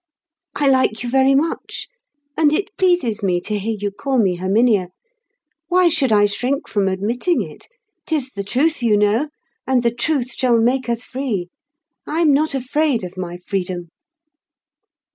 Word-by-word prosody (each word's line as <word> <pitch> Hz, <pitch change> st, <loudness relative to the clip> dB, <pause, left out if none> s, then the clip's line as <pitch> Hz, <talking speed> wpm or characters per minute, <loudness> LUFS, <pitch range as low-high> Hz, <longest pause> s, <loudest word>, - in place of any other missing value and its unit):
"I 290 Hz, -, +1 dB
like 260 Hz, -4 st, +2 dB
you 240 Hz, -, -4 dB
very 270 Hz, +1 st, +4 dB
much, 315 Hz, +4 st, -2 dB, 0.5 s
and 305 Hz, -2 st, +3 dB
it 390 Hz, +6 st, -2 dB
pleases 350 Hz, -, +1 dB
me 180 Hz, -3 st, +1 dB
to 210 Hz, +2 st, -2 dB
hear 220 Hz, +2 st, -2 dB
you 205 Hz, 0 st, -2 dB
call 265 Hz, +6 st, -2 dB
me 190 Hz, -6 st, +2 dB
Herminia. 200 Hz, +1 st, +2 dB, 0.8 s
Why 360 Hz, 0 st, +4 dB
should 290 Hz, -7 st, +1 dB
I 205 Hz, -1 st, +5 dB
shrink 250 Hz, +7 st, -2 dB
from 200 Hz, -2 st, 0 dB
admitting 225 Hz, -, 0 dB
it? -, -, -12 dB, 0.4 s
'Tis 285 Hz, -5 st, -1 dB
the 200 Hz, -4 st, -5 dB
Truth, 275 Hz, +9 st, 0 dB
you 220 Hz, -3 st, +3 dB
know; 210 Hz, +8 st, +2 dB, 0.4 s
and 260 Hz, -2 st, +2 dB
the 235 Hz, -1 st, +1 dB
Truth 255 Hz, 0 st, -1 dB
shall 245 Hz, -3 st, +2 dB
make 250 Hz, +2 st, +1 dB
us 235 Hz, 0 st, -1 dB
Free. 245 Hz, -9 st, -3 dB, 0.6 s
I'm 315 Hz, -1 st, +2 dB
not 300 Hz, +1 st, +1 dB
afraid 270 Hz, -2 st, 0 dB
of 180 Hz, +1 st, -7 dB
my 175 Hz, -1 st, -5 dB
freedom." 180 Hz, -1 st, -4 dB
245 Hz, 160 wpm, -20 LUFS, 205-280 Hz, 0.8 s, I